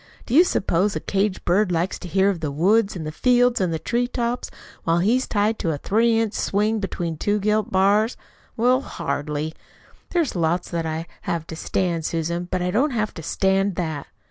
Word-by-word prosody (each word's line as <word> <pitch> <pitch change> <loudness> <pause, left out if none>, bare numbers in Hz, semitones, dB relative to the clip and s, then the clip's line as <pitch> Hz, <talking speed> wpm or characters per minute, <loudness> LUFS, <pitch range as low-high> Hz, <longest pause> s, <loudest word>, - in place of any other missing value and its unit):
Do 235 - -5
you 325 +6 +8
suppose 195 - +1
a - - -1
caged 195 0 -1
bird 185 +2 +2
likes 175 +2 -1
to 185 - -8
hear 195 +3 +3
of 180 - -5
the 155 -2 -2
woods 195 +9 +2
and 155 -3 -5
fields 245 +2 +3
and 165 -4 -1
tree 245 +1 +1
tops 240 0 -2 0.3
while 165 0 +2
he's 230 +9 +2
tied 215 +1 +1
to 170 - -1
a - - -3
three 225 +7 +2
inch 225 -2 0
swing 215 +2 0
between 175 -5 -3
two 205 +6 +1
gilt 210 +1 0
bars? 200 +5 +3 0.4
Well, 250 +3 +3
hardly! 150 - -3 0.6
There's 335 - 0
lots 170 +1 0
that 165 -2 -2
I 160 +1 -3
do - - -20 0.2
have 165 -2 -1
to 160 - -7
stand, 170 0 -1
Susan, 170 +2 -2
but 185 - -1
I 180 - 0
don't 255 +10 +2
have 215 -5 -2
to 165 - -8
stand 195 +3 +1
that." 160 -5 -3
195 Hz, 195 wpm, -23 LUFS, 165-220 Hz, 0.6 s, you